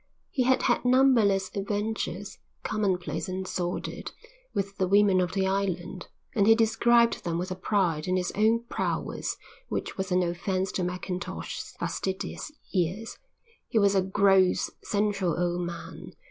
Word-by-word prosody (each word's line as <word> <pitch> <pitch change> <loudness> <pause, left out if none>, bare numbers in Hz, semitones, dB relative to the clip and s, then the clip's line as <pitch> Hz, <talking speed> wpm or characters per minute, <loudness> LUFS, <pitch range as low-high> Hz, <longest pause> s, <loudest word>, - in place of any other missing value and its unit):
He 265 - 0
had 260 0 +3
had - - +2
numberless 235 -7 +4
adventures, 205 -1 -3 0.2
commonplace 190 -4 -1
and 185 0 -4
sordid, 175 -1 -3 0.4
with 200 0 -3
the 185 - +2
women 200 -1 +5
of 180 0 -1
the 195 -1 +1
island 190 -2 -2 0.3
and 200 -2 +3
he 225 - +8
described 235 +1 +3
them 170 -2 -1
with 180 +2 -3
a - - -2
pride 180 -5 0
in 185 0 +2
his 180 -1 -1
own 225 +3 +2
prowess 240 - -2 0.3
which - - -3
was 190 0 -2
an 180 0 +3
offence 185 +2 -1
to 185 - -2
Mackintosh's 180 +1 -5
fastidious 190 +9 -3 0.2
ears. 190 +4 -1 0.5
He - - -1
was 200 -2 +5
a 195 - +4
gross, 190 -1 +3
sensual 200 -4 0
old 175 0 0
man. 170 -1 -8
195 Hz, 145 wpm, -27 LUFS, 180-210 Hz, 0.5 s, he